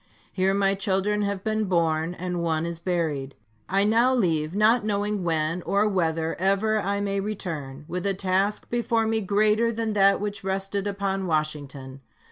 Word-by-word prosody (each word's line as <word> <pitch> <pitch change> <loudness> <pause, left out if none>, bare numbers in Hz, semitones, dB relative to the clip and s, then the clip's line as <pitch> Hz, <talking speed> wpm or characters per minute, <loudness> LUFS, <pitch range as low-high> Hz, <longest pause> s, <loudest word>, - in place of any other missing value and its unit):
Here 190 0 +1
my 195 -1 +2
children 200 +1 0
have 200 -2 -2
been 215 0 0
born, 165 -2 0
and 180 0 -3
one 160 -1 0
is 170 -1 -4
buried. 160 -7 -2 0.3
I 195 +1 +2
now 230 +5 +3
leave, 165 -7 0
not 220 +3 +4
knowing 205 -1 -1
when 165 +1 0
or 200 +4 +1
whether 165 -4 0
ever 200 +3 +2
I 200 0 -1
may 200 -1 -1
return, 160 -9 -5
with 180 +3 -3
a 195 - 0
task 195 +2 -1
before 235 -1 +1
me 220 0 0
greater 215 +3 +2
than 225 -1 -2
that 195 -1 +4
which 205 -1 -4
rested 195 +1 -2
upon 195 -1 -2
Washington. 145 -4 -3
195 Hz, 165 wpm, -25 LUFS, 170-210 Hz, 0.3 s, not